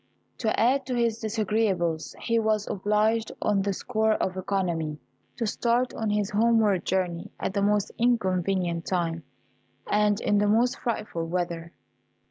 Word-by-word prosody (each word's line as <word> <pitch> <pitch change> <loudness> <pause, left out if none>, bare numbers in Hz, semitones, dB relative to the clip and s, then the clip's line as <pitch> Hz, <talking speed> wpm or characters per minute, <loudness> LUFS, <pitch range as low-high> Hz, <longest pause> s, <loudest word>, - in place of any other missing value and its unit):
To 220 -3 0
add 260 +4 +2
to 255 - -1
his 230 -2 +1
disagreeables, 210 -7 0
he 230 -1 +1
was 215 -1 +1
obliged, 215 +3 +1
on 205 -2 +1
the 200 +1 0
score 220 +2 0
of 185 -3 -1
economy, 175 -5 -1 0.4
to 230 - -1
start 240 +3 +1
on 220 -1 -2
his 210 -1 0
homeward 215 -3 +3
journey 180 -2 -1
at - - -2
the 200 - 0
most 205 0 +1
inconvenient 185 -7 +1
time, 170 -3 -1 0.6
and 210 -1 +2
in 205 - +2
the 205 - +2
most 235 +4 +2
frightful 210 -8 -3
weather. 170 -1 -3
205 Hz, 145 wpm, -26 LUFS, 185-225 Hz, 0.6 s, homeward